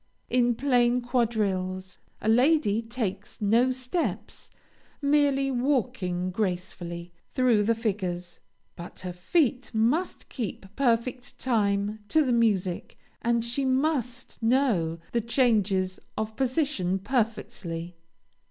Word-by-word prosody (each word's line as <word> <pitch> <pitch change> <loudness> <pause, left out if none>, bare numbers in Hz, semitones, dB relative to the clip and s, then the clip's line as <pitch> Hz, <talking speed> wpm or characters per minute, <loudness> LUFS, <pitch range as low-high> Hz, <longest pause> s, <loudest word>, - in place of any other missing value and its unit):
In 245 -1 +3
plain 245 -2 +3
quadrilles, 200 -6 -1 0.2
a - - -3
lady 245 -2 +4
takes 225 -4 -4
no 230 +4 +3
steps, 255 +6 -3 0.5
merely 280 -2 +2
walking 240 -9 0
gracefully 175 -3 -3 0.2
through 250 -5 +4
the 230 +3 +2
figures, 185 -6 -3 0.4
but 170 +1 -8
her 180 -1 -5
feet 250 - +1
must 250 +12 +1
keep 225 -5 -5
perfect 250 0 0
time 210 -3 0
to 315 +3 +3
the 250 - +2
music, 200 -6 +1 0.2
and 235 0 +1
she 240 +4 0
must 260 -2 -1
know 225 -10 +2
the 235 - +1
changes 210 -6 +2 0.2
of 220 0 -3
position 260 - 0
perfectly. 190 -6 -2
230 Hz, 105 wpm, -27 LUFS, 190-255 Hz, 0.5 s, lady